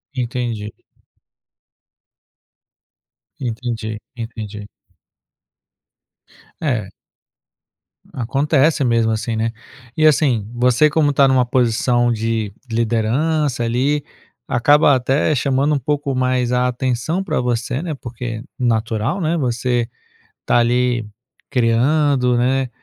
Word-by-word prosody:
Entendi. 120 -4 -3 2.7
Entendi, 115 -3 -4 0.2
entendi. 110 -3 -7 2.0
É. 115 -10 -1 1.2
Acontece 140 +4 +1
mesmo 115 -2 +2
assim, 110 +1 -2
né? 115 +1 -1 0.4
E 155 - +2
assim, 130 -8 +2
você 125 +5 +3
como 150 -1 +2
tá 140 0 +5
numa 130 -2 +3
posição 120 -1 +2
de 110 -2 -1 0.2
liderança 120 +5 0
ali, 135 +5 0 0.4
acaba 145 +3 +4
até 135 +4 +1
chamando 140 +2 +1
pouco 140 0 -2
mais 125 -1 +1
a 125 0 +2
atenção 125 +8 -1
pra 160 -5 -1
você, 125 +2 -1
né, 170 -3 -3
porque 120 -3 -6 0.2
natural, 115 - 0
né, 165 +1 0
você 120 -3 0 0.6
tá - - +3
ali 120 -1 +1 0.4
criando, 125 +1 +2
né, 130 +2 +1
125 Hz, 95 wpm, -19 LUFS, 115-140 Hz, 2.7 s, tá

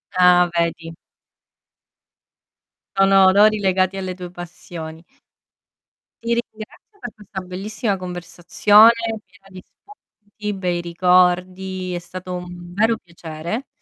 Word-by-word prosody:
Ah, 180 -1 +5
vedi? 165 -1 -2 2.0
Sono 195 0 +5
odori 210 +3 +5
legati 190 -1 +1
alle 185 -1 -4
tue 180 -1 -9
passioni. 170 -2 -9 1.2
Ti 235 0 0
ringrazio 235 - -7
per 245 - -8
questa 210 -2 -9
bellissima 200 +4 -3
conversazione, 185 +4 +4 0.3
piena 195 +1 -23
di 185 -1 -12
spunti, 210 - -10
bei 180 -2 -2
ricordi, 180 +1 +1
è 175 - -3
stato 185 +1 -8
un 175 0 -9
vero 220 +4 +2
piacere. 170 - -7
185 Hz, 105 wpm, -20 LUFS, 175-205 Hz, 2.0 s, Ah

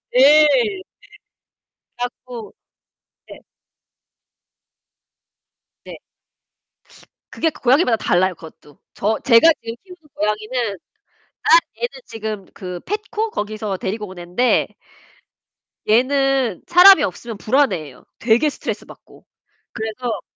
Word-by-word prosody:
네. 310 - +4 1.1
그래 245 0 -2
갖고 245 -4 -11 0.8
네. - - -11 2.5
네. - - -9 1.3
그게 325 - 0
고 - - -16
고양이마다 255 -1 +3
달라요, 185 -2 +1
그것도. 155 -3 -16 0.2
저 215 +2 -1
제가 265 +6 +6
지금 230 0 -6
키우는 360 -2 -14 0.2
고양이는 215 0 -2 0.7
아 - - -2 0.3
얘는 480 - -1 0.2
지금 215 -3 -6
그 180 -2 -7
펫코 425 +1 -4
거기서 210 - -4
데리고 210 +3 -4
온 185 -1 -11
앤데 180 +9 0 1.2
얘는 260 -2 +2
사람이 360 -1 +8
없으면 220 +4 -5
불안해 265 +6 +1
해요, 145 -5 -12 0.2
되게 240 +6 +2
스트레스 - - -6
받고. - - -17 0.5
그래서 220 +1 -4
230 Hz, 220 characters per minute, -19 LUFS, 210-285 Hz, 2.5 s, 사람이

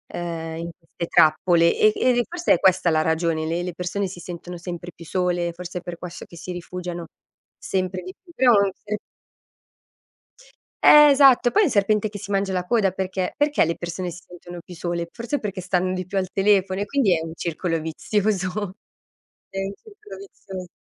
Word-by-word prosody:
uhm, 165 -2 -4
in 170 +1 -5
queste 170 0 -7
trappole. 170 +2 +4
E 215 - +5
e 255 - +2
e 240 - +2
forse 350 0 +1
è - - +2
questa 185 -2 +3
la 155 -1 +3
ragione: 160 -1 0
le 165 +2 -1
le 180 -1 -4
persone 180 +3 -2
si 180 -1 -9
sentono 175 0 -8
sempre 175 0 -7
più 170 - -12
sole, 175 0 -1
forse 180 +1 -7
è - - -14
per 175 -1 -7
questo 175 -1 -8
che 170 - -14
si 180 +2 -7
rifugiano 175 -1 -6 0.5
sempre 185 -1 -2
di 185 +1 -8
più. 345 - -17
Però 250 -5 +5 0.2
se 210 +1 -5 1.9
Eh 300 0 +9
esatto, 270 -3 +6
poi 425 - +3
è - - +4
il 290 - 0
serpente 210 +1 +2
che 205 -1 -8
si 195 - -9
mangia 195 -1 0
la 180 -1 0
coda 205 -3 +2
perché 185 0 -3
perché 290 - +2
le 165 - -1
persone 175 +1 -4
si 175 +2 -10
sentono 175 0 -10
più 180 - -11
sole? 170 0 -3
Forse 240 +5 -3
perché 195 -3 -5
stanno 185 0 0
di 185 -1 -3
più 195 - -4
al 185 -1 -3
telefono 195 -1 +2
e - - -1
quindi 220 -11 +2
è 160 - -4
un 160 - -7
circolo 165 0 -2
vizioso. 195 +3 -1 0.7
È 195 - -5
un 195 +1 -4
circolo 425 - -13
vizios 190 - -9
180 Hz, 195 wpm, -23 LUFS, 170-205 Hz, 1.9 s, Eh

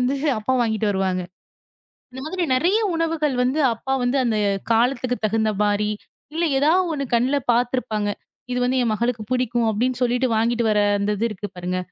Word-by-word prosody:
வந்து 255 +3 +1 0.2
அப்பா 215 +5 -1
வாங்கிட்டு 220 -2 0
வருவாங்க. 190 -2 0 0.9
இந்த 260 - -7
மாதிரி 365 +1 -2
நிறைய 345 +9 +2 0.2
உணவுகள் 320 -4 0
வந்து 265 +5 0
அப்பா 265 +4 -4
வந்து 245 +3 +1
அந்தக் 210 -4 0
காலத்துக்குத் 245 0 +1
தகுந்த 220 0 +1
மாரி, 210 0 +1 0.4
இல்ல 335 +2 -1 0.2
ஏதாவது 340 +5 +3
ஒண்ணு 280 -2 -2
கண்ணுல 260 +5 +2 0.2
பாத்துருப்பாங்க, 235 -4 0 0.4
இது 250 - 0
வந்து 260 +1 +1
என் 225 - +1
மகளுக்குப் 230 0 -2
பிடிக்கும் 240 -2 0
அப்படின்னு 245 +4 0
சொல்லிட்டு 250 +1 +1
வாங்கிட்டு 235 +1 +1
வர 210 - +2 0.2
அந்த 205 +1 0
இது 230 - 0
இருக்கு 205 0 -6
பாருங்க. 180 +1 -3
240 Hz, 165 wpm, -22 LUFS, 215-260 Hz, 0.9 s, ஏதாவது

